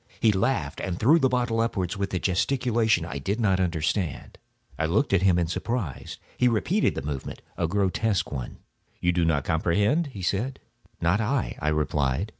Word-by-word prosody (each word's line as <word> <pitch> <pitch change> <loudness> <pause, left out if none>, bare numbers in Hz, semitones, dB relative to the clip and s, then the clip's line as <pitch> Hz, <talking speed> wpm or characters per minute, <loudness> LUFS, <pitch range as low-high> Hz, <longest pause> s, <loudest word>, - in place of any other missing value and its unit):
He 110 - +4
laughed 105 +7 -1
and 90 -2 -3
threw 150 +9 +5
the 135 -3 +3
bottle 120 -3 +1
upwards 95 -5 -1
with 100 0 -3
a - - +2
gesticulation 110 0 +1
I 70 -5 -5
did 100 - -2
not 95 -5 +2
understand. 85 -2 -2 0.4
I 80 - +1
looked 100 - +1
at 95 - +4
him 95 -2 +4
in 85 - +2
surprise. 90 - -4 0.2
He 125 - +4
repeated 160 - +1
the - - -4
movement—a 75 +4 -5
grotesque 100 +3 0
one. 65 -4 -5 0.4
"You 90 - +2
do 90 -1 +1
not 80 -4 +1
comprehend?" 105 - +1
he 100 -9 -8
said. 115 +9 -1 0.4
"Not 85 +6 +2
I," 120 +2 -1
I 75 - -3
replied. 75 +3 0
95 Hz, 175 wpm, -26 LUFS, 85-115 Hz, 0.4 s, threw